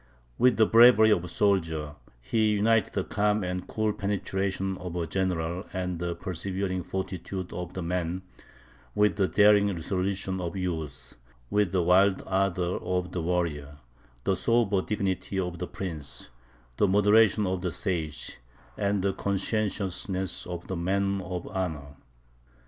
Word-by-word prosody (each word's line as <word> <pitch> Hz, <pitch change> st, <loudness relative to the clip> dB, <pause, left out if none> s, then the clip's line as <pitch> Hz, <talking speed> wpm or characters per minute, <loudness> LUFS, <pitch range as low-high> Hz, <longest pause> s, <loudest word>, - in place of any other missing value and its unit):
With 125 Hz, -1 st, +4 dB
the 110 Hz, -, +6 dB
bravery 115 Hz, -1 st, +7 dB
of 90 Hz, -, +3 dB
the 90 Hz, -, -7 dB
soldier, 80 Hz, -6 st, 0 dB, 0.3 s
he 110 Hz, -, +1 dB
united 110 Hz, 0 st, +2 dB
the -, -, 0 dB
calm 105 Hz, 0 st, +1 dB
and 90 Hz, 0 st, -3 dB
cool 110 Hz, -1 st, 0 dB
penetration 95 Hz, -1 st, -2 dB
of 90 Hz, -2 st, -6 dB
the 85 Hz, -1 st, -2 dB
general 90 Hz, 0 st, -2 dB
and 90 Hz, -2 st, -3 dB
the 85 Hz, 0 st, -2 dB
persevering 95 Hz, +1 st, -3 dB
fortitude 95 Hz, 0 st, -5 dB
of 90 Hz, 0 st, -6 dB
the 95 Hz, -, -3 dB
man, 90 Hz, +1 st, -2 dB, 0.7 s
with 105 Hz, 0 st, +3 dB
the 95 Hz, -2 st, +3 dB
daring 105 Hz, 0 st, +5 dB
resolution 95 Hz, +1 st, -2 dB
of 85 Hz, 0 st, -4 dB
youth; 80 Hz, -6 st, -4 dB, 0.4 s
with 105 Hz, -4 st, +2 dB
the 90 Hz, -2 st, +1 dB
wild 95 Hz, +2 st, +4 dB
ardour 95 Hz, -2 st, 0 dB
of 90 Hz, 0 st, -2 dB
the 90 Hz, -, -3 dB
warrior, 80 Hz, -4 st, -2 dB, 0.5 s
the 95 Hz, -, +1 dB
sober 105 Hz, -1 st, +2 dB
dignity 95 Hz, -1 st, -2 dB
of 90 Hz, -2 st, -3 dB
the 90 Hz, -, -3 dB
prince, 80 Hz, -9 st, -7 dB, 0.5 s
the 105 Hz, -, +4 dB
moderation 105 Hz, +1 st, +4 dB
of 95 Hz, -1 st, -1 dB
the 90 Hz, -, -1 dB
sage, 80 Hz, -5 st, -3 dB, 0.4 s
and 100 Hz, -2 st, 0 dB
the 100 Hz, -1 st, +1 dB
conscientiousness 100 Hz, -2 st, -2 dB
of 90 Hz, -1 st, -6 dB
the 95 Hz, -, -4 dB
man 100 Hz, +3 st, 0 dB
of 90 Hz, -1 st, -5 dB
honour. 75 Hz, -7 st, -4 dB
95 Hz, 145 wpm, -27 LUFS, 90-100 Hz, 0.7 s, bravery